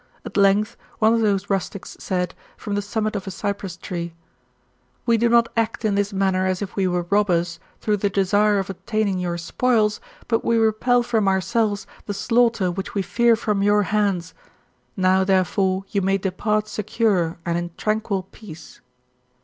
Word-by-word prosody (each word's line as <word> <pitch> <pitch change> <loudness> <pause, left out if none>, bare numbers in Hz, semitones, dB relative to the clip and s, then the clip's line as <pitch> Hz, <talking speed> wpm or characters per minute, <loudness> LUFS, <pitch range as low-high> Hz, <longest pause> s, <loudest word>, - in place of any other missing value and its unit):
At - - -8
length 200 +1 +3 0.2
one 220 +1 +4
of 230 - +2
those 200 -2 +1
rustics 195 0 -3
said, 180 -2 -2 0.2
from 205 - -5
the 205 - 0
summit 215 +1 -2
of 195 -1 -4
a - - -1
cypress 195 -2 -4
tree: 170 -3 -5 0.5
" - - -41
We 235 - +4
do 235 +1 +2
not 235 0 +5
act 230 0 -1
in 210 - +2
this 205 +1 0
manner 190 -1 +1
as 185 -1 0
if 195 - -8
we 195 -2 +1
were 180 -1 -1
robbers, 175 -5 +1 0.2
through 210 -1 +1
the 205 +1 0
desire 205 +2 +2
of 195 0 -2
obtaining 205 0 -1
your 175 -1 -2
spoils, 215 +4 +1 0.3
but 225 -1 +1
we 230 - +2
repel 225 +2 +3
from 220 -4 +1
ourselves 205 +2 +1 0.2
the 205 - -3
slaughter 230 -4 +2
which 195 +3 -6
we 200 - +1
fear 235 +4 +3
from 210 -3 -1
your 205 +1 +4
hands. 195 -4 0 0.6
Now, 190 0 +3
therefore, 190 0 +1
you 200 - +1
may 195 +1 +2
depart 210 +3 -1
secure, 210 -5 0
and 170 -1 0
in 175 0 -2
tranquil 215 -3 -1
peace. 165 -7 -12
200 Hz, 175 wpm, -22 LUFS, 185-215 Hz, 0.6 s, not